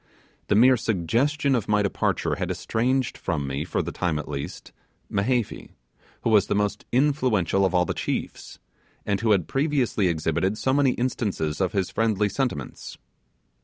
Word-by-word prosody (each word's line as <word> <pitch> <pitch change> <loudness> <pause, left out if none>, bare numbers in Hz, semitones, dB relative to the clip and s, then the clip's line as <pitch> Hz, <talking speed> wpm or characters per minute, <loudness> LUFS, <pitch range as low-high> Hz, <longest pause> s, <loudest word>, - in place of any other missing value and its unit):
The 105 - +2
mere 125 +4 +6
suggestion 120 - +1
of 120 -5 0
my 105 -1 +2
departure 100 - 0
had - - -2
estranged 125 +3 -1
from 75 -4 -2
me, 70 +2 -3
for 85 - -2
the - - -4
time 85 -4 -1
at 75 - -5
least, 70 -1 -6 0.4
Mehevi, 115 +3 -1 0.5
who 115 - +1
was 105 -2 +5
the - - 0
most 105 0 -1
influential 125 - +2
of 95 -1 0
all 90 0 +4
the - - -2
chiefs, - - -4 0.5
and 100 -1 0
who 115 - +1
had 95 -6 +3
previously 135 - +1
exhibited 85 +4 0
so 130 +5 0
many 140 -2 +3
instances 100 -10 -2
of 95 - 0
his 95 -3 -1
friendly 105 -2 +1
sentiments. 120 - -4
105 Hz, 165 wpm, -25 LUFS, 90-125 Hz, 0.5 s, mere